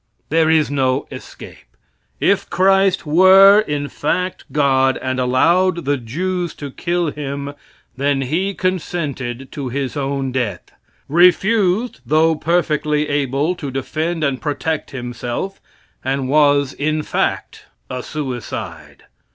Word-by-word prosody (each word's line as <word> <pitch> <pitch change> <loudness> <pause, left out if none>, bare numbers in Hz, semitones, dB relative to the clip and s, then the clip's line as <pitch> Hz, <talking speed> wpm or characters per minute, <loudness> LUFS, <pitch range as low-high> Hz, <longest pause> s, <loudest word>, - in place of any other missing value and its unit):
There 160 0 +3
is 160 -2 +3
no 135 -1 0
escape. 65 - -12 0.4
If - - +1
Christ 195 0 +3
were, 190 +5 +7
in 145 -8 -2
fact, 180 +6 -2
God 135 -2 +2
and 130 0 -2
allowed 170 +8 +2
the 145 +1 +1
Jews 175 +8 -3
to 145 -2 -7
kill 175 +1 -1
Him, 140 -1 -5 0.4
then 140 +1 0
He 180 +9 -1
consented 145 -9 -3
to 140 -3 -5
His 135 +2 -3
own 135 -2 -2
death 120 -8 -3 0.4
refused, 190 - +3
though 155 +5 +3
perfectly 150 -2 0
able, 145 +3 0
to 155 -6 -6
defend 155 +5 -3
and 135 -3 -1
protect 155 +1 -2
Himself, 125 +7 -5 0.4
and 135 0 -1
was, 145 -1 +3
in 155 +1 -1
fact, - - -2 0.2
a 125 0 -5
suicide. 130 -5 -6
145 Hz, 120 wpm, -19 LUFS, 135-175 Hz, 0.4 s, were